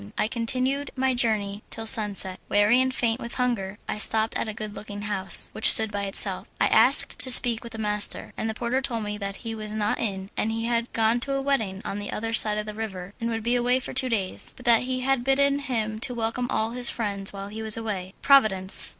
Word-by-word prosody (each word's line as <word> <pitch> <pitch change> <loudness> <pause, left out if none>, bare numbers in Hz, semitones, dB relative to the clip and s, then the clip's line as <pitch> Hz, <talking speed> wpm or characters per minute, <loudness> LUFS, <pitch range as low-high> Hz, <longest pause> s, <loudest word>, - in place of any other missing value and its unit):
I - - 0
continued 255 +5 -2
my 265 0 0
journey 215 -4 0
till 225 - -7
sunset. 205 -5 +3
Weary 210 +5 +3
and 260 0 0
faint 235 -1 -1
with 235 - -7
hunger 215 -6 -2
I - - -4
stopped 220 +1 +1
at - - -2
a - - -3
good 215 -1 -7
looking 205 -1 -9
house, 200 -2 +3
which - - +5
stood 220 -1 +5
by 200 -1 -3
itself. 195 - 0
I - - +3
asked - - +3
to 260 - +5
speak 245 -2 +6
to 235 - -10
the 225 - -7
master, 210 -1 0
and 220 - -4
the 220 - -5
porter 240 +3 -2
told 235 -5 -3
me 210 0 -5
that 200 -1 -5
he 225 - -4
was 215 -1 -7
not 210 -1 -1
in 195 -3 -4
as 215 - -1
he 225 0 -3
had 235 0 -2
gone 225 +1 +1
to 275 +3 -3
a 275 - -1
wedding 220 -8 -2
on 205 - -4
the 205 - -6
other 225 +1 -4
side 215 -1 +5
of 210 - -3
the 215 - -7
river, 200 -4 -7
and 230 - -2
would 225 -1 -4
be 240 +2 0
away 245 +1 +1
for - - -8
two 260 0 +3
days, 200 -5 -3
but 250 - -14
that 235 -2 +4
he 255 0 -2
had 265 -1 0
bidden 280 +2 +1
him 220 -6 -4
to 245 +1 -1
welcome 230 +2 -3
all 220 +1 -1
his 245 0 +2
friends 200 -3 +1
while 195 0 -8
he 220 +2 -8
was 220 0 +5
away. 200 -4 -6
Providence! 215 -9 +3
225 Hz, 240 wpm, -24 LUFS, 210-245 Hz, -, speak